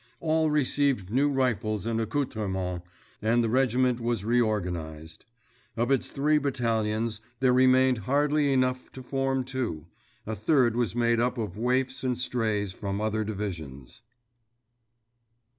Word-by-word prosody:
All 160 Hz, -1 st, +1 dB
received 140 Hz, -8 st, +1 dB
new 140 Hz, +5 st, +3 dB
rifles 115 Hz, -6 st, 0 dB
and 115 Hz, 0 st, 0 dB
accoutrements, 100 Hz, -8 st, -2 dB, 0.4 s
and 115 Hz, +2 st, +2 dB
the 115 Hz, -, 0 dB
regiment 125 Hz, 0 st, +2 dB
was 115 Hz, -4 st, -2 dB
reorganized. 90 Hz, -9 st, -2 dB, 0.5 s
Of 120 Hz, +3 st, 0 dB
its 135 Hz, -, +2 dB
three 150 Hz, +2 st, +1 dB
battalions 115 Hz, -5 st, -1 dB, 0.2 s
there 130 Hz, -1 st, +3 dB
remained 130 Hz, -1 st, +4 dB
hardly 145 Hz, +3 st, +1 dB
enough 130 Hz, -1 st, 0 dB
to 130 Hz, -, -9 dB
form 135 Hz, 0 st, -1 dB
two—a 110 Hz, -, -6 dB
third 120 Hz, -, +2 dB
was 120 Hz, -2 st, -1 dB
made 120 Hz, -1 st, +2 dB
up 125 Hz, +2 st, 0 dB
of 105 Hz, -3 st, -4 dB
waifs 130 Hz, +2 st, 0 dB
and 125 Hz, -2 st, 0 dB
strays 110 Hz, -6 st, -1 dB
from 100 Hz, +1 st, -4 dB
other 110 Hz, 0 st, 0 dB
divisions. 90 Hz, -, -6 dB
120 Hz, 125 wpm, -27 LUFS, 105-130 Hz, 0.5 s, remained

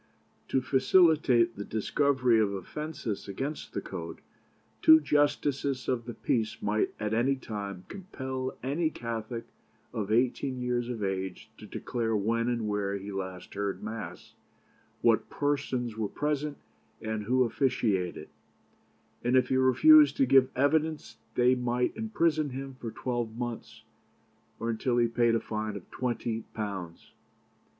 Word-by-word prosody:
To 130 Hz, -, +1 dB
facilitate 130 Hz, -4 st, +4 dB
the 100 Hz, -, -4 dB
discovery 125 Hz, +2 st, +2 dB
of 105 Hz, -2 st, +2 dB
offences 115 Hz, -, -5 dB
against 135 Hz, +10 st, -5 dB
the 100 Hz, -, -2 dB
code, 85 Hz, -4 st, -7 dB, 0.6 s
two 160 Hz, 0 st, +9 dB
justices 145 Hz, -2 st, +1 dB
of 120 Hz, -3 st, -1 dB
the 120 Hz, -, -6 dB
peace 110 Hz, -2 st, -1 dB
might 105 Hz, +1 st, 0 dB
at 105 Hz, 0 st, -2 dB
any 125 Hz, +5 st, +2 dB
time 100 Hz, -7 st, -6 dB
compel 130 Hz, -9 st, -5 dB
any 155 Hz, +5 st, 0 dB
Catholic 115 Hz, -3 st, -5 dB, 0.5 s
of 105 Hz, -1 st, -3 dB
eighteen 125 Hz, +3 st, +1 dB
years 125 Hz, -1 st, -1 dB
of 115 Hz, -4 st, -3 dB
age 95 Hz, +2 st, -3 dB
to 105 Hz, -, -10 dB
declare 115 Hz, +1 st, -2 dB
when 115 Hz, +3 st, +1 dB
and 120 Hz, -3 st, -1 dB
where 100 Hz, -1 st, -1 dB
he 100 Hz, +1 st, -7 dB
last 95 Hz, -2 st, -6 dB
heard 100 Hz, 0 st, -3 dB
Mass, 110 Hz, 0 st, -7 dB, 0.7 s
what -, -, +3 dB
persons 135 Hz, -5 st, -1 dB
were 110 Hz, -1 st, -1 dB
present, 150 Hz, 0 st, -2 dB, 0.4 s
and 110 Hz, -1 st, -3 dB
who 130 Hz, +3 st, +3 dB
officiated; 115 Hz, -8 st, 0 dB, 0.9 s
and 120 Hz, +2 st, +2 dB
if 125 Hz, 0 st, +3 dB
he 130 Hz, -, +2 dB
refused 300 Hz, -, +7 dB
to 275 Hz, -, +4 dB
give 135 Hz, -, +5 dB
evidence 155 Hz, +3 st, +1 dB, 0.2 s
they 125 Hz, +1 st, +5 dB
might 125 Hz, 0 st, 0 dB
imprison 165 Hz, -9 st, +1 dB
him 135 Hz, +1 st, -6 dB
for 115 Hz, -, -5 dB
twelve 120 Hz, -1 st, -3 dB
months, 120 Hz, -2 st, -6 dB, 0.8 s
or 115 Hz, 0 st, -1 dB
until 120 Hz, +2 st, 0 dB
he 120 Hz, -1 st, +4 dB
paid 115 Hz, 0 st, +2 dB
a -, -, +2 dB
fine 110 Hz, -1 st, -4 dB
of 100 Hz, -, -10 dB
twenty 120 Hz, -2 st, -2 dB
pounds. 95 Hz, -6 st, -5 dB
120 Hz, 140 wpm, -29 LUFS, 110-135 Hz, 0.9 s, two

